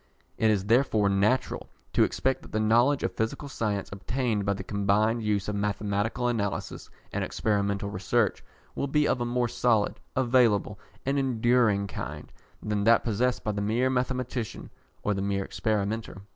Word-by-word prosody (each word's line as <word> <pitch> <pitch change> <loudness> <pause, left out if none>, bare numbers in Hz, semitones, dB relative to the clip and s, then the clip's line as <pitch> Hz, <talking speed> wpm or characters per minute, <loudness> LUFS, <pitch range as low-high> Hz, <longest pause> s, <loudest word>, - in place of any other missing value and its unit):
It 110 - +2
is 100 -3 +1
therefore 110 -3 +3
natural 100 +6 +1 0.2
to - - +5
expect 130 0 0
that - - -14
the 110 - 0
knowledge 120 +6 +3
of - - -1
physical 110 +6 -2
science 105 -7 -2
obtained 105 0 -2
by 100 - +3
the 100 - -6
combined 105 +3 +1
use 105 -3 0
of 105 - -2
mathematical 105 +3 -1
analysis 105 -5 -3 0.2
and - - -1
experimental 100 -2 -1
research 100 +2 0 0.3
will 140 - -2
be 150 +1 +2
of 125 - 0
a - - 0
more 120 0 0
solid, 120 -3 +1 0.2
available, 120 -5 +2 0.3
and 140 +1 +1
enduring 120 -5 +2
kind 100 - -7 0.3
than 105 -1 -1
that 115 0 +5
possessed 120 +3 0
by 105 - 0
the 100 -1 -3
mere 120 +5 +1
mathematician 125 -3 -3 0.3
or 105 - +1
the 95 - -2
mere 100 -1 -1
experimenter. 110 -1 -2
110 Hz, 160 wpm, -27 LUFS, 100-125 Hz, 0.3 s, to